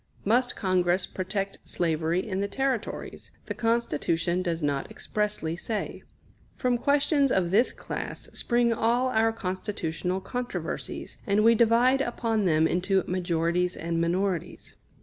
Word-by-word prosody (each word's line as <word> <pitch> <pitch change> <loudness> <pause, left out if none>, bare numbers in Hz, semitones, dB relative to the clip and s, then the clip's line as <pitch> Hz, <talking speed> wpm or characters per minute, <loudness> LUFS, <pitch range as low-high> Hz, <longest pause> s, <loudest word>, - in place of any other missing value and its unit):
Must 245 +4 +2
Congress 180 -1 +1
protect 195 +1 -3
slavery 165 +2 0
in 190 -2 -2
the 200 - 0
Territories? 265 0 -3 0.2
The - - -3
Constitution 180 -6 0
does 170 -3 -2
not 140 -1 -1
expressly 210 -6 -2
say. 210 +5 -4 0.5
From 250 -2 +1
questions 280 0 +3
of 175 -2 +1
this 225 +6 +4
class - - -5
spring 240 -1 +2
all 240 +3 +2
our 225 -1 +3
constitutional 185 -3 -3
controversies, 245 +6 -5
and 205 +1 +3
we 230 +1 +7
divide 235 +4 +4
upon 225 -4 0
them 160 -2 +4
into 185 +2 +1
majorities 175 0 0
and 165 0 -1
minorities. 180 +1 -2
195 Hz, 130 wpm, -27 LUFS, 175-230 Hz, 0.5 s, we